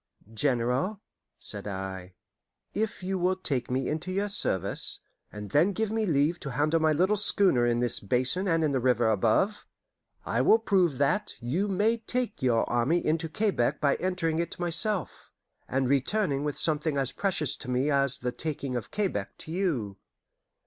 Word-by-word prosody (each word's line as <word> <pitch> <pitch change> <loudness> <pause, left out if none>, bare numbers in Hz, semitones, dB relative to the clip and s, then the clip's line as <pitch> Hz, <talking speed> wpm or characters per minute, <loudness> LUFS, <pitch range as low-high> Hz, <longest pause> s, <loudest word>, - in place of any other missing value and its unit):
"General," 130 - 0 0.4
said 105 -1 +2
I, 95 -2 -6 0.6
"if 220 -2 -3
you 190 0 -2
will 180 +1 +1
take 135 -10 -2
me 130 +1 -1
into 160 +4 -3
your 200 +2 -1
service, 100 - +1 0.3
and 105 -1 -8
then 175 - +3
give 220 +1 -1
me 220 -1 0
leave 155 +2 +1
to 140 - -6
handle 150 +5 +1
my 155 0 +3
little 185 +7 +2
schooner 190 -11 +3
in 120 0 +1
this 120 -2 +2
basin 130 - 0
and 165 -2 +2
in 150 - +1
the 135 - +1
river 120 -2 +2
above, 110 - +1 0.6
I - - 0
will 220 - +5
prove 185 - +1
that 145 +9 0
you 150 +12 -1
may 205 +4 +1
take 230 0 -3
your 120 -3 +2
army 125 +9 +1
into 160 +1 0
Quebec 150 - 0
by 140 -2 +2
entering 175 -3 -1
it 170 +1 -3
myself, 175 +2 -1 0.4
and 130 0 0
returning 140 - +1
with 150 -1 -3
something 155 -2 0
as 135 -2 0
precious 180 -8 -1
to - - -9
me 130 +4 +1
as 140 -1 +2
the 125 0 -3
taking 140 -3 -4
of 120 - -4
Quebec 205 -2 -3
to 155 - -9
you." 145 - -2
150 Hz, 170 wpm, -28 LUFS, 125-185 Hz, 0.6 s, will